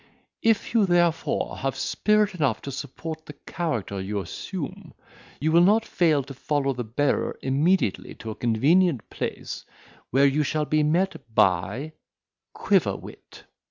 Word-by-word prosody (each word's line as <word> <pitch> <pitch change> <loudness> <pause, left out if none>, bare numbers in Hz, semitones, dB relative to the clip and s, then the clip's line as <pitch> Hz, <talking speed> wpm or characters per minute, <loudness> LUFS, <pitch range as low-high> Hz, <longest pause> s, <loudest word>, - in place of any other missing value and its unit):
If 225 0 +1
you 220 -4 +4
therefore 175 -2 +1
have 135 0 -2
spirit 210 -1 +1
enough 145 -10 0
to 140 - -5
support 155 +4 -7
the 150 - -8
character 115 - -3
you 100 +2 -3
assume, 95 - -6 0.4
you 155 +2 +1
will 170 +1 +6
not 215 +5 +4
fail 155 -5 +2
to 135 +1 -9
follow 140 0 -1
the 125 -1 -4
bearer 130 +6 0
immediately 140 - +1
to 110 - -7
a - - -7
convenient 135 - +2
place, - - -5 0.5
where 135 +3 +4
you 140 +2 +3
shall 150 +1 0
be 155 +1 +2
met 155 -7 0
by 100 - +1 0.6
"Quiverwit." - - -1
150 Hz, 140 wpm, -25 LUFS, 125-175 Hz, 0.6 s, will